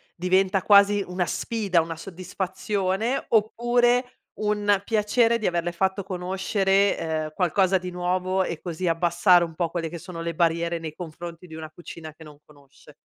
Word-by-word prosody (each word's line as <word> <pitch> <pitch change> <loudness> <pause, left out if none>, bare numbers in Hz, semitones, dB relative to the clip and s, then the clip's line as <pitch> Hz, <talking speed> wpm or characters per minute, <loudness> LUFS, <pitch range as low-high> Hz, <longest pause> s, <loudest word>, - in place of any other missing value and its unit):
diventa 185 +2 +2
quasi 200 0 +5
una 180 0 -1
sfida, 200 -4 0
una 165 0 -5
soddisfazione, 190 +6 -2
oppure 240 +3 +2 0.3
un 205 -1 +1
piacere 225 +2 +2
di 215 - -1
averle 175 0 -1
fatto 190 +3 -1
conoscere, 190 -2 0
uhm, - - -27
qualcosa 185 +2 +2
di 180 0 -6
nuovo, 185 +1 0
e 170 -3 -4
così 175 0 -4
abbassare 175 +1 +4
un 165 -2 -6
po' 170 0 -1
quelle 165 -1 -3
che 170 - -7
sono 170 0 -8
le 170 -1 -4
barriere 170 +1 +1
nei 160 -2 -6
confronti 170 +1 -9
di 160 - -10
una 160 -1 -8
cucina 160 -1 -10
che 160 - -15
non 150 -2 -13
conosce? 140 -2 -19
180 Hz, 160 wpm, -25 LUFS, 170-200 Hz, 0.3 s, quasi